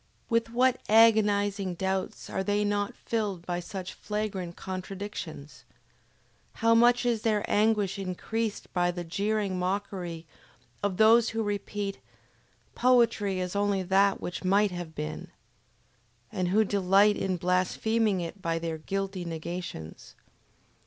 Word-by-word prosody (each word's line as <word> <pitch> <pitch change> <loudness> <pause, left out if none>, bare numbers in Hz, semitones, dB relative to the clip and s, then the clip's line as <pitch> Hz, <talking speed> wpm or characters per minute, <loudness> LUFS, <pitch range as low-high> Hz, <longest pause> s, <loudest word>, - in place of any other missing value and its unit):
With 230 0 +2
what 255 +2 +2
agonizing 205 -4 +4
doubts 190 +1 -3
are 190 - -2
they 205 +1 +1
not 205 0 -1
filled 205 -6 -3
by 175 -1 -2
such 185 +1 -6
flagrant 200 -5 -4
contradictions! 185 -5 -7 0.9
How 230 0 +3
much 240 +1 +4
is 235 -3 +1
their 215 -3 +1
anguish 210 -2 +2
increased 205 +4 -3
by 175 -1 +2
the 175 0 -4
jeering 200 +2 -1
mockery 180 -3 -3 0.6
of 200 -3 -1
those 225 +2 +6
who 225 0 -2
repeat: 205 -1 -3 0.7
"Poetry 230 -6 +3
is 180 +1 -3
only 200 -1 +1
that 195 +2 +3
which 180 +2 -5
might 200 +2 +3
have 175 -3 -6
been" 75 0 -5 1.0
and 180 -1 -1
who 210 +5 +4
delight 200 +1 +4
in 190 -2 -1
blaspheming 185 +3 +1
it 170 +3 -6
by 165 -2 -1
their 165 -1 -4
guilty 195 +2 -3
negations! 170 - -7
195 Hz, 125 wpm, -28 LUFS, 180-210 Hz, 1.0 s, those